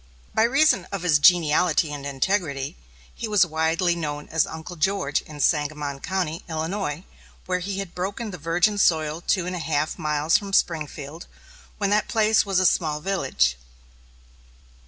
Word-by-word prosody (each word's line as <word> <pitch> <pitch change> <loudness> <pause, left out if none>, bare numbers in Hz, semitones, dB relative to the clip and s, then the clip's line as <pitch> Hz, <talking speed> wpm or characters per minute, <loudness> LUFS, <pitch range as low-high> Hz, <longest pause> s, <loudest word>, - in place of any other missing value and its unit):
By - - +2
reason 265 - +3
of 195 -3 -4
his 160 -5 +4
geniality 160 -1 +4
and 140 -1 -6
integrity, 140 -1 -1 0.4
he 230 - -5
was 210 -4 +4
widely 165 +2 0
known 150 -3 -4
as 160 - +1
"Uncle 160 +2 -8
George" 175 -3 0
in 150 -1 -12
Sangamon 145 -2 0
County, 170 -1 -3
Illinois, 160 0 -3 0.4
where 180 0 -1
he 195 +2 -4
had 195 -3 -5
broken 200 +5 -4
the 180 - -8
virgin 175 +6 +1
soil 160 -3 +2
two 180 0 0
and 180 0 -3
a - - -4
half 155 +1 -1
miles 155 0 +2
from 200 -1 -8
Springfield, 155 -2 -1 0.5
when 200 -1 0
that 210 +1 +2
place 220 -1 +2
was 195 -2 0
a 185 - +2
small 155 -4 +2
village. 135 - 0
165 Hz, 155 wpm, -24 LUFS, 150-190 Hz, 0.5 s, his